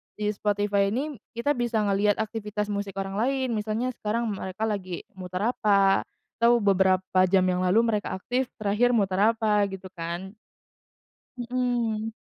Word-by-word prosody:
di 210 0 -1
Spotify 205 -1 +1
ini 280 +2 -3 0.2
kita 235 +5 0
bisa 235 -2 0
ngelihat 205 0 +2
aktivitas 210 -1 -3
musik 200 -1 -3
orang 195 +1 -4
lain 260 +1 0
misalnya 215 +4 -1
sekarang 225 +2 -1
mereka 190 +1 -5
lagi 190 -5 -3
muter 180 0 -5
apa 200 -2 +3 0.3
atau 235 +1 +5
beberapa 190 -1 +2
jam 190 0 +4
yang 180 -1 +1
lalu 195 +6 +4
mereka 210 -4 -1
aktif 250 +6 -1
terakhir 220 +4 +2
muter 195 -4 +1 0.2
apa 210 -2 +2
gitu 190 -1 -8
kan. 175 +2 -5 1.1
Mhm. 240 -3 -1
210 Hz, 140 wpm, -26 LUFS, 195-230 Hz, 1.1 s, atau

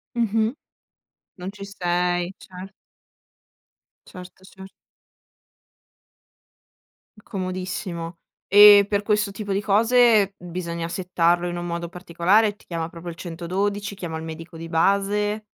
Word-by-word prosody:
Mh-mh. 225 0 +1 0.8
Non 185 +2 -6
ci 200 -1 -9
sei, 175 -1 -1
cer 185 +2 -11 1.3
Certo, 185 0 -12
cer 190 0 -13 2.5
Comodissimo. 185 -3 -5 0.3
E 205 0 +9
per 205 -1 +1
questo 210 -1 +1
tipo 200 -1 -4
di 200 - 0
cose, 220 -1 +4
bisogna 170 -1 -5
settarlo 175 -1 +1
in 175 - -4
un 175 - -4
modo 170 0 -4
particolare, 185 +5 +1
ti - - -24
chiama 165 -1 -4
proprio 170 +1 -8
il 165 - -13
112, 195 +5 -3
chiama 165 -4 -5
il 160 - -7
medico 165 +1 -9
di 165 0 -7
base? 200 +5 +1
185 Hz, 115 wpm, -23 LUFS, 170-205 Hz, 2.5 s, E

